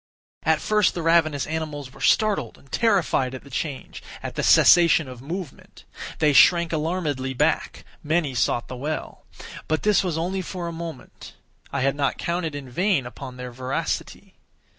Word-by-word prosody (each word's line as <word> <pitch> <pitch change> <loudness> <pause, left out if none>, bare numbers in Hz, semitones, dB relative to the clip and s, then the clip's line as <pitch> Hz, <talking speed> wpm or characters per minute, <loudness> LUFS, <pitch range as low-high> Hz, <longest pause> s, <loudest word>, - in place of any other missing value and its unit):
At 160 0 +2
first 210 -2 +2
the 170 - -3
ravenous 160 -4 +3
animals 150 -4 -5
were - - -14
startled 200 - +2
and 135 - -22
terrified 180 - +1
at 130 - -9
the 140 - -15
change—at 140 0 -6
the - - -2
cessation 165 -3 +6
of 125 -2 -10
movement. 165 +1 -8 0.3
They 150 -2 +3
shrank 170 +4 +5
alarmedly 150 -5 -2
back; - - 0 0.2
many 155 -2 0
sought 120 -1 0
the 130 - -7
well. 150 +4 -5 0.4
But 155 0 -1
this 210 -1 +3
was 175 -4 -2
only 185 +3 -2
for 180 -1 -5
a - - -4
moment. 165 -4 -9 0.4
I 140 - -2
had 135 +1 +1
not 140 -1 0
counted 170 -3 -2
in 140 -2 -7
vain 170 +2 +1
upon 125 +1 -9
their 125 0 -7
voracity. 130 +2 -4
155 Hz, 160 wpm, -24 LUFS, 135-170 Hz, 0.4 s, cessation